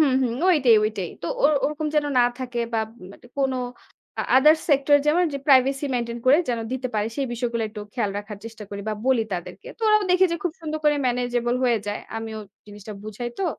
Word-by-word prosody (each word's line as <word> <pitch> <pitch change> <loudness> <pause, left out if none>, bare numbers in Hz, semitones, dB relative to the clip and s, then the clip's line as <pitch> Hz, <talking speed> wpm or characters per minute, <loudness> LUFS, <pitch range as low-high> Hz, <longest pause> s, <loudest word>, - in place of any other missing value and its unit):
হুম, 275 -4 +3
হুম। 240 -2 0 0.2
ওইটাই, 260 -9 +5
ওইটাই। 205 -5 -2
তো - - -3 0.2
ও - - +3 0.2
ওরকম 300 +1 -1
যেন 300 -1 +3
না - - +6 0.2
থাকে, 250 -2 -5
বা 225 - +1 0.3
মানে - - -16
কোন 270 -1 +1 0.8
আদার 300 +4 +7
সেক্টর 285 0 +5
যেমন 345 +4 +4
যে, 280 - -3
প্রাইভেসি 270 0 +4
মেইনটেইন 235 -1 -2
করে 275 +4 +7
যেন 240 -2 0
দিতে 260 0 -2
পারে, 210 0 +1
সেই 275 -2 -1
বিষয়গুলো 235 -1 -2
একটু 210 - -8
খেয়াল 230 -5 0
রাখার 205 0 -8
চেষ্টা 225 -1 -9
করি 200 0 -5
বা 215 - -1
বলি 260 -4 +3
তাদেরকে। 175 -2 -6
তো - - -31
ওরাও 425 0 +5
দেখে 365 +1 +5
যে, - - 0
খুব 355 - -1
সুন্দর 310 -1 -4
করে 295 -1 +4
ম্যানেজেবল 245 -1 0
হয়ে 240 -2 +3
যায়। 205 0 -3 0.2
আমিও 225 -1 -5 0.3
জিনিসটা 210 0 -10
বুঝাই 215 +3 -5
তো। 390 - 0
245 Hz, 210 wpm, -24 LUFS, 225-285 Hz, 0.8 s, আদার